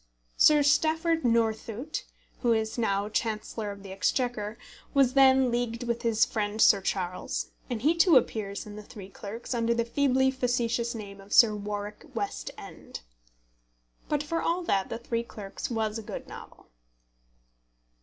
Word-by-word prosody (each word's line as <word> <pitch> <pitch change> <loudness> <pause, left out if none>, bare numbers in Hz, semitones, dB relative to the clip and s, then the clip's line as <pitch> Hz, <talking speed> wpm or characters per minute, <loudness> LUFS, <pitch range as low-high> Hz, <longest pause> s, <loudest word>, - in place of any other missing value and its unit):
Sir 300 -1 +6
Stafford 320 +3 +2
Northcote, 230 +3 -1 0.3
who 240 -2 +3
is 220 -1 -1
now 200 -3 0
Chancellor 215 0 -2
of 200 -1 -8
the 195 - -9
Exchequer, 215 +2 -1 0.4
was 265 -2 +4
then 265 -2 +5
leagued 240 0 -2
with 235 -1 -2
his 225 -2 +3
friend 210 -1 -3
Sir 200 -2 +6
Charles, 180 -2 -3 0.2
and 235 -2 -3
he 310 +4 +5
too 335 -3 +6
appears 205 -5 -1
in 210 0 -9
The - - -7
Three 205 -2 -11
Clerks 215 +5 -7
under 235 -1 +1
the 235 0 0
feebly 265 +1 +2
facetious 240 -2 -1
name 200 -2 -8
of 195 +1 -9
Sir 220 -3 +7
Warwick 205 0 -5
West - - -3
End. - - -10 1.1
But 295 -1 0
for 330 +2 -2
all 350 +2 0
that 195 - 0
The 230 - -3
Three 230 0 -2
Clerks 205 -4 -7
was 220 -2 -1
a - - -6
good 210 - -7
novel. - - -12
230 Hz, 155 wpm, -28 LUFS, 210-255 Hz, 1.1 s, Sir